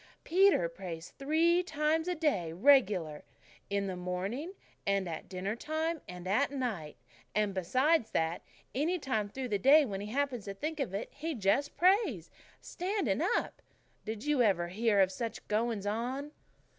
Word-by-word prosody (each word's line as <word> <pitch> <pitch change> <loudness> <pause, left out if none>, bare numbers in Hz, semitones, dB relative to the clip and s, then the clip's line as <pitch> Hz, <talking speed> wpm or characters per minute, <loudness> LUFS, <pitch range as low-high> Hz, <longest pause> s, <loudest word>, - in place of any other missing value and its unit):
Peter 375 - +4
prays 170 -1 -8
three 325 +5 +3
times 320 -1 0
a 360 - 0
day 280 - 0
regular 190 - +3 0.5
in 200 0 0
the 190 -1 -3
morning 190 - -4 0.3
and 200 -2 0
at 160 -2 -6
dinner 190 +3 -3
time 315 +4 -2
and 180 0 -8
at 220 +9 +2
night 230 - -4 0.4
and 210 -2 +1
besides 255 - +2
that, 160 +1 -1 0.3
any 320 +7 +1
time 220 -9 -1
through 260 +4 -4
the 205 -2 0
day 285 +7 +7
when 195 -5 -4
he 205 - -5
happens 265 -4 -1
to 200 -1 -5
think 310 +7 -4
of 240 -9 -2
it, 200 - -4
he 315 +2 -4
just 230 +7 +1
prays, 360 - +2 0.3
standing 390 +3 -1 0.2
up. - - -4 0.4
Did 220 0 -5
you 295 -3 +2
ever 180 -6 +2
hear 210 +2 +2
of 190 0 +3
such 230 +4 -5
goings 220 -1 0
on?" 250 +7 -2
230 Hz, 160 wpm, -32 LUFS, 195-295 Hz, 0.5 s, day